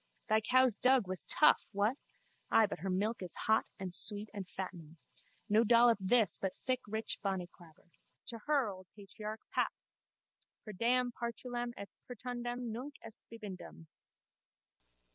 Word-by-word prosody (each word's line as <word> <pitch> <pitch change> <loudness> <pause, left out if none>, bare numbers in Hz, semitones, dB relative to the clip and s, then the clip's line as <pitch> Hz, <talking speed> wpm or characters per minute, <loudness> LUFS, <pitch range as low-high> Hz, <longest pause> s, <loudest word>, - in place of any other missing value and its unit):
Thy 220 0 +4
cow's 255 0 +4
dug 255 -5 +4
was 185 -1 -2
tough, 305 - +5
what? 205 +5 +2 0.5
Ay, 225 - +6
but 200 - -5
her 190 +4 -3
milk 205 +5 0
is 180 -2 -5
hot 220 0 +3
and 190 -3 -5
sweet 205 +2 -2
and 195 -3 -6
fattening. 170 -4 -7 0.5
No 215 +2 +4
dollop 235 0 +5
this 200 -2 +4
but 190 -1 -2
thick 255 -1 +1
rich 220 +1 -2
bonnyclaber. 175 -4 -6 0.4
To 230 -1 -5
her, 285 -5 +3
old 185 -2 -8
patriarch! 210 +1 -7
Pap! - - +1 0.9
_Per 215 -3 -7
deam 245 +4 +2
Partulam 240 +1 -4
et 200 - -6 0.2
Pertundam 245 0 -4
nunc 260 +6 -6
est 225 -1 -9
bibendum! 185 - -9
220 Hz, 145 wpm, -34 LUFS, 190-240 Hz, 0.9 s, Ay